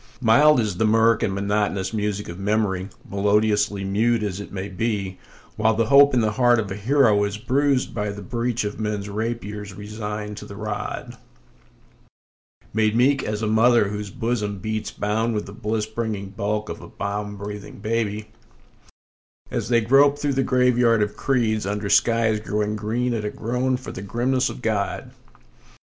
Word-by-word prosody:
Mild 140 +5 +5
is 105 -6 -1
the 110 - +2
mirk 115 0 +4
and 95 - +1
monotonous 100 0 -1
music 105 -1 -2
of 85 +2 -8
memory, 100 -2 0 0.2
melodiously 105 0 +1
mute 110 +4 +1
as 100 -2 -3
it 100 - -8
may 95 0 -4
be, 100 -2 -3 0.4
While 110 +1 +2
the 115 +1 +2
hope 140 +3 +6
in 120 - +4
the 110 -1 +1
heart 120 +2 +4
of 105 -3 -2
a - - -3
hero 110 -1 +3
is 100 0 -2
bruised 130 +3 +1
by 105 -2 -2
the 100 0 -6
breach 120 +1 -1
of 105 +1 -4
men's 105 -2 -3
rapiers, 105 -2 -4
resigned 105 0 -6
to - - -8
the 100 - -10
rod; 105 0 -5 1.6
Made 110 0 +2
meek 135 +3 +3
as 105 +1 -3
a - - +1
mother 110 -1 +4
whose 105 0 -5
bosom 115 -3 -2
beats 110 +2 -3
bound 110 +3 -1
with 105 - -2
the 100 - -10
bliss 110 -1 -2
bringing 110 -3 -4
bulk 105 +2 -2
of - - -6
a - - -10
balm 105 0 -4
breathing 105 0 -7
baby, 105 0 -2 1.2
As - - -2
they 120 -1 +4
grope 140 +5 +5
through 145 -1 -1
the 135 - +1
graveyard 125 -3 +3
of 105 0 -4
creeds, 110 -5 0
under 105 0 -2
skies 115 -2 +3
growing 105 0 -2
green 115 +4 -1
at 110 -2 -2
a 105 - -1
groan 125 +4 -1
for 130 - -8
the - - -7
grimness 125 +6 0
of 125 - -9
God. 105 -3 -2
110 Hz, 175 wpm, -23 LUFS, 105-115 Hz, 1.6 s, hope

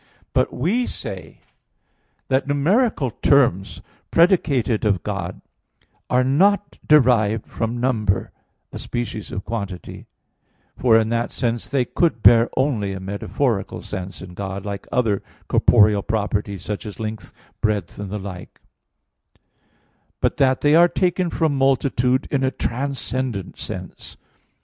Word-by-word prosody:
But - - +2
we 200 - 0
say 90 -6 -7 0.9
that 135 +1 +1
numeral 150 - +1
terms 115 -8 +2 0.3
predicated 145 - +2
of 100 -6 +1
God - - -4 0.7
are 125 +1 +3
not 195 +11 +2
derived 115 -7 +4
from 115 +1 -3
number, 110 -6 0 0.4
a - - -6
species 120 -3 -5
of 95 - -5
quantity, 100 -4 -6 0.7
for 115 -3 +4
in 110 -1 +1
that 115 0 0
sense 120 -1 -2
they 135 -3 +1
could 170 +6 0
bear 115 0 +7
only 120 -8 0
a 95 - -5
metaphorical 100 +3 -2
sense 95 +1 -6
in 90 -1 -10
God, 95 +1 -5
like 100 -1 -5
other 110 -6 +1 0.3
corporeal 105 -3 +4
properties, 105 -3 -2
such 105 +1 -5
as 105 - -9
length, 110 0 -5 0.3
breadth, 105 -5 -1
and 100 -1 -5
the 105 - -4
like; 95 -3 -9 1.6
but - - 0
that 130 -2 +2
they 145 0 +4
are 170 +2 +7
taken 180 0 0
from 160 -3 0
multitude 135 -1 +1
in 135 -2 +1
a 130 - +3
transcendent 130 -4 -3
sense. - - -7
115 Hz, 130 wpm, -21 LUFS, 100-140 Hz, 1.6 s, bear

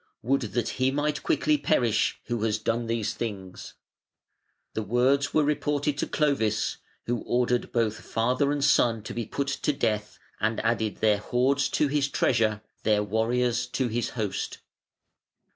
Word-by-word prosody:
Would 135 +4 +2
that 120 -2 0
he 130 - +4
might 145 +2 -1
quickly 150 -1 +2
perish 120 -5 +1
who 120 -2 -2
has 110 -1 +1
done 115 +2 -1
these 115 -2 -1
things!" 95 -5 -6 1.0
The 110 - -2
words 125 +6 +2
were 155 - +3
reported 145 0 0
to - - 0
Clovis, 115 -9 0 0.3
who 120 0 -1
ordered 125 0 0
both 115 -2 0
father 125 +6 0
and 145 -1 -1
son 115 -3 +3
to - - -6
be 115 -2 -4
put 140 0 -2
to - - +2
death, 110 -7 -2 0.2
and 110 +1 0
added 110 -1 -1
their 105 -2 +3
hoards 130 +6 +1
to 150 - +3
his 140 0 +1
treasure, 110 -6 +1 0.2
their 105 -1 +2
warriors 115 +3 0
to 130 -3 -1
his 120 +1 -1
host. 105 -4 -2
120 Hz, 155 wpm, -27 LUFS, 110-140 Hz, 1.0 s, he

